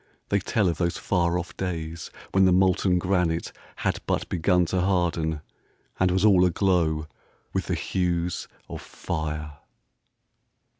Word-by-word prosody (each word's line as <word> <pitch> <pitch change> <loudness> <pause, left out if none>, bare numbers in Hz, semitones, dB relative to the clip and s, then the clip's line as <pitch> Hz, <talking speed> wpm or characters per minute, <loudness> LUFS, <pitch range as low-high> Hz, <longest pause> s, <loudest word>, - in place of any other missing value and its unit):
They 100 - +2
tell 105 0 +1
of 85 - -1
those 85 -1 0
far 85 -2 +1
off 85 -2 -5
days 85 -3 -4 0.2
when 95 0 +4
the 95 - +5
molten 95 0 +3
granite 90 -2 0 0.2
had - - -1
but - - 0
begun 90 +1 +2
to 90 +2 0
harden, 85 -4 0 0.6
and 95 - +4
was 95 +3 +2
all 95 -4 +6
aglow 85 -4 +2 0.5
with - - -1
the - - 0
hues 90 -1 -1 0.2
of - - -7
fire. 75 -2 -5
90 Hz, 140 wpm, -25 LUFS, 80-95 Hz, 0.6 s, all